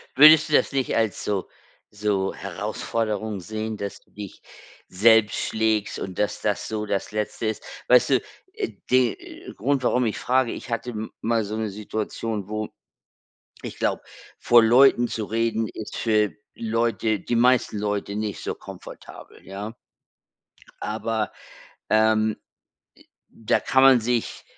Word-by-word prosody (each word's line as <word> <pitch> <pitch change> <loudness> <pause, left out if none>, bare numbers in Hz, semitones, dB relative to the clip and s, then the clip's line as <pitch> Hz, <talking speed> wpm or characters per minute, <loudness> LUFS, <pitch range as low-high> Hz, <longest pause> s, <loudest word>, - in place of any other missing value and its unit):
Würdest 155 +3 +8
du - - -3
das - - +4
nicht 135 -3 -1
als 110 -4 0
so 100 -3 -2 0.4
so 105 -2 -1
Herausforderung 110 -2 -3
sehen, 110 +4 -5
dass 100 -1 -6
du - - -32
dich 100 -2 -9 0.5
selbst 110 +2 +4
schlägst 110 -2 0
und 95 -2 -6
dass, 105 - -1
das 105 -1 -1
so 105 -1 -3
das 100 0 -2
Letzte 105 +1 -3
ist? 110 - -3 0.2
Weißt 125 +2 +5
du, 130 -2 +3 0.3
äh, 415 -3 -3 0.2
den 125 -2 0
Grund, 135 +4 0
warum 125 0 +2
ich 110 - -1
frage, 130 -1 +1
ich - - -8
hatte 115 +1 -3
m 110 -1 -6
mal 115 -1 +1
so 105 +2 -4
'ne 110 -1 -2
Situation, 105 0 -4
wo 110 0 -3 0.9
ich - - -7
glaube, - - 0 0.4
vor 120 -1 +6
Leuten 120 +1 +5
zu 110 -2 -4
reden 115 0 0
ist 110 - -7
für 105 -3 +2 0.2
Leute 115 -2 0
die 120 - -2
meisten 125 -2 +3
Leute 105 -1 -2
nicht 105 -1 -3
so - - -2
komfortabel, - - -12
ja 100 +3 -6 1.1
aber, 110 0 -2 0.6
ähm, 110 0 +3
äh, - - -12 1.1
da - - +3
kann 130 0 +3
man 135 -2 +7
sich, 120 0 -2
110 Hz, 145 wpm, -24 LUFS, 105-120 Hz, 1.1 s, Würdest